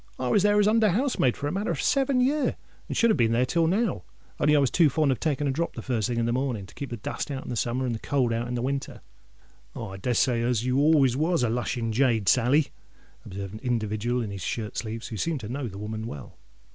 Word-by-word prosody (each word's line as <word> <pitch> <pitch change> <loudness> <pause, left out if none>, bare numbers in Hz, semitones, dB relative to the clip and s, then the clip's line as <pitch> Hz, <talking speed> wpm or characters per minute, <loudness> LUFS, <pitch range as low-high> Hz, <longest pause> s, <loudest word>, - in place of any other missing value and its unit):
I 125 - -2
was 200 - +4
there 205 +1 +4
as 205 - +4
under 220 0 +4
housemaid 200 - +1
for - - -5
a - - -2
matter 200 +4 -2
of 165 - -1
seven 270 -2 +2
year; 285 +3 +1 0.3
and - - -4
should 230 -1 +4
have - - +2
been 115 -2 +2
there 120 +2 +3
till 165 +5 +1
now, 195 - 0 0.4
only 150 +1 +4
I - - +5
was 135 -3 +2
too 165 -4 +4
fond 150 0 +2
of 130 - -1
taking 145 -2 0
a - - +1
drop 165 +5 -2
the 115 - -6
first 115 -5 -1
thing 120 - -2
in 115 - +1
the 120 - 0
morning, 125 -6 -2
to - - -16
keep 140 - -6
the 120 - -5
dust 105 - -4
out 135 -2 -5
in 120 - -4
summer 120 +3 -1
and 120 - -1
the 110 - -4
cold 130 -4 0
out 115 +1 -2
in 125 - -3
winter." 135 +1 -3 0.7
"Ah—I 95 -4 -6
des 120 +6 -1
say 120 0 +2
you 125 +2 0
was 140 -4 +4
always 160 0 +1
a 120 - +2
lushing 120 -1 -2
jade, 115 -4 +2
Sally," 130 - +3 0.6
observed 100 +1 -6
an 110 - -7
individual 120 0 -1
in 105 - -5
his 100 -1 -6
shirt 110 +2 -4
sleeves, 115 0 -4
and - - -7
who 110 - -4
seemed 160 +2 -1
to 105 - -7
know 130 +1 -3
the 100 -3 -8
woman 110 +2 -5
well. 75 -10 -9
125 Hz, 260 wpm, -26 LUFS, 115-155 Hz, 0.7 s, I